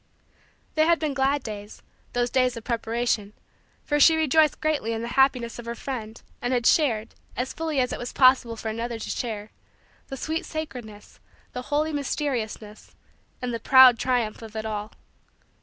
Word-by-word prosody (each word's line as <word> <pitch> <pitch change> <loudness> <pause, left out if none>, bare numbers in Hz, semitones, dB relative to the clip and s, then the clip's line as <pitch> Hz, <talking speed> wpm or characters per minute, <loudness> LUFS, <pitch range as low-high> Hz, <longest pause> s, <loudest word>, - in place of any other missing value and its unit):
They 310 0 +3
had 340 0 +4
been 305 -3 -2
glad 275 0 +1
days 210 -1 -8 0.3
those 245 0 0
days 255 -2 +2
of 230 - -8
preparation 230 -3 -1 0.5
for 295 0 0
she 320 +3 +7
rejoiced 315 0 +3
greatly 295 -8 0
in 225 0 -3
the 235 - -4
happiness 250 -3 +2
of 235 - -9
her 235 - -3
friend 225 -3 -6 0.2
and 245 +1 -1
had 240 -2 0
shared, 235 -8 +2 0.2
as 250 +1 -2
fully 320 -3 -2
as 250 -1 +1
it - - -5
was 245 - -5
possible 255 -3 +4
for 225 0 -5
another 230 +1 -3
to 225 - -7
share, 215 -3 -4 0.6
the 270 - -6
sweet 320 +4 -2
sacredness, 245 -10 -7 0.3
the 250 - -4
holy 305 +2 0
mysteriousness, 245 -7 -4 0.5
and 245 -1 -2
the 230 - -3
proud 255 -1 +7
triumph 245 -4 0
of 220 -1 -11
it 220 0 -4
all. 215 -1 -4
245 Hz, 175 wpm, -25 LUFS, 225-280 Hz, 0.6 s, she